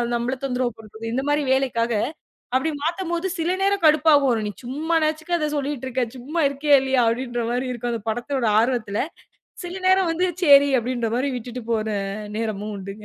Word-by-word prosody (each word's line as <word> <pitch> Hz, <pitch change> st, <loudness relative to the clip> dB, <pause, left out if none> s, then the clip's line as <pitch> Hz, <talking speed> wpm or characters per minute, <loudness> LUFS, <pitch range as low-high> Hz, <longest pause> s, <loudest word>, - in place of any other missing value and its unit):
நம்மளை 240 Hz, +3 st, -1 dB
தொந்தரவு 250 Hz, -2 st, -1 dB
பண்றதோ, 220 Hz, 0 st, -13 dB
இந்த 265 Hz, +2 st, -1 dB
மாரி 295 Hz, 0 st, +2 dB
வேலைக்காக, 240 Hz, -3 st, 0 dB, 0.6 s
அப்படி 265 Hz, +5 st, +2 dB
மாத்தும்போது 340 Hz, +1 st, -1 dB
சில 335 Hz, +2 st, 0 dB
நேரம் 395 Hz, -2 st, +1 dB
கடுப்பாகும். 285 Hz, -7 st, +4 dB
நீ -, -, -2 dB, 0.2 s
சும்மா 310 Hz, +6 st, -1 dB
நாச்சுக்கும் 315 Hz, +3 st, -1 dB
அதைச் 300 Hz, -1 st, -1 dB
சொல்லிட்டு 280 Hz, -2 st, -3 dB
இருக்க. 255 Hz, 0 st, 0 dB
சும்மா 305 Hz, +7 st, -2 dB
இருக்கியா, 285 Hz, +1 st, +4 dB
இல்லையா 265 Hz, -2 st, +2 dB
அப்படின்ற 240 Hz, +1 st, -2 dB
மாரி 250 Hz, +1 st, -1 dB
இருக்கும். 240 Hz, 0 st, -3 dB
அந்தப் 225 Hz, -1 st, -5 dB
படத்தோட 240 Hz, +3 st, -2 dB, 0.2 s
ஆர்வத்துல. 225 Hz, -4 st, 0 dB, 0.6 s
சில 355 Hz, +2 st, -5 dB
நேரம் 375 Hz, -2 st, +4 dB
வந்து 360 Hz, +3 st, +1 dB, 0.2 s
செரி 285 Hz, -2 st, +7 dB
அப்படின்ற 240 Hz, -1 st, -2 dB
மாரி 260 Hz, +3 st, 0 dB
விட்டுட்டு 245 Hz, +1 st, -6 dB
போற 220 Hz, -1 st, 0 dB, 0.5 s
நேரமும் 215 Hz, -1 st, -3 dB
உண்டுங்க. 200 Hz, +2 st, -8 dB
260 Hz, 165 wpm, -23 LUFS, 235-305 Hz, 0.6 s, செரி